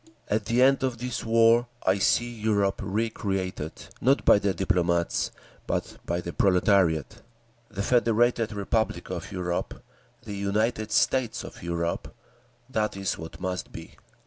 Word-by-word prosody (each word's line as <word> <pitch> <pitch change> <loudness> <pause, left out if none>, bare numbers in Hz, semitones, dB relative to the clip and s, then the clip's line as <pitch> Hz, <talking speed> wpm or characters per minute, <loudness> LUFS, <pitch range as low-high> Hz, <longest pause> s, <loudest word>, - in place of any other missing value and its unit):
_… - - -23 0.2
"At 105 0 0
the 120 +4 +3
end 135 0 +4
of 130 -3 -1
this 125 0 -4
war 115 +1 +4 0.2
I 95 +1 +3
see 120 +5 +3
Europe 105 -4 0
recreated, 95 -5 -2 0.3
not 135 +3 +3
by - - +7
the 100 -1 +1
diplomats, 85 -3 0 0.4
but - - -2
by 85 +1 -1
the 85 - -6
proletariat. 95 - +2 0.5
The 100 -3 -4
Federated 115 0 +2
Republic 100 -3 -1
of 90 +4 -5
Europe—the 90 +2 -6
United 105 +2 -1
States 115 0 +1
of - - -10
Europe—that 85 +5 -4
is 95 -1 -2
what 80 0 -9
must 90 -1 -4
be. - - -10
100 Hz, 135 wpm, -26 LUFS, 90-115 Hz, 0.5 s, by